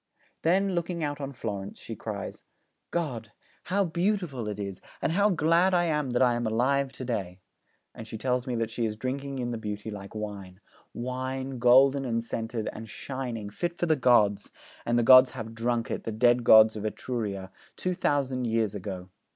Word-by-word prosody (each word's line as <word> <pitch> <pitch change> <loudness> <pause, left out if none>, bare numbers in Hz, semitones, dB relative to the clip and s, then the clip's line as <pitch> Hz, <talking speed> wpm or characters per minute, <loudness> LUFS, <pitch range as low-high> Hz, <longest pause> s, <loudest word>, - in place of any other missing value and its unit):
Then, 190 +4 +2
looking 170 -1 -2
out 145 -1 -3
on 140 0 -4
Florence, 100 -6 -5
she - - -7
cries, - - -6 0.5
'God! 125 -10 -3 0.3
how 200 +1 +1
beautiful 170 - -1
it 105 -1 -4
is, 100 -2 -5 0.2
and - - 0
how 200 +5 +3
glad 170 +1 +3
I 175 - +3
am 150 -5 0
that 125 +1 +2
I 125 -1 +4
am 120 -1 -1
alive 130 +5 +1
to 130 - -7
day!' 95 -7 -3 0.5
And 110 - -9
she 110 - -6
tells 125 +2 -1
me 125 - -1
that 115 -1 -1
she 120 +1 -2
is 105 - -4
drinking 135 +4 -4
in 120 -1 -2
the 115 - -4
beauty 105 0 -5
like 100 0 -9
wine, 100 -3 -6 0.3
'wine, 130 +1 -4
golden 135 +3 +5
and 115 -3 -1
scented, 115 -1 -4
and 110 0 -8
shining, 120 -5 -5
fit 175 - -3
for - - 0
the 160 -2 +3
gods; 105 -6 +3 0.4
and 120 0 +2
the 120 - +3
gods 130 +2 +8
have 110 -1 -6
drunk 115 +1 -1
it, - - -3
the 115 - -3
dead 120 +2 +3
gods 110 -1 +7
of 105 - -5
Etruria, 105 -4 -4 0.2
two 185 - -1
thousand 135 -6 0
years 110 -3 0
ago. 95 -2 -6
120 Hz, 190 wpm, -28 LUFS, 110-140 Hz, 0.5 s, gods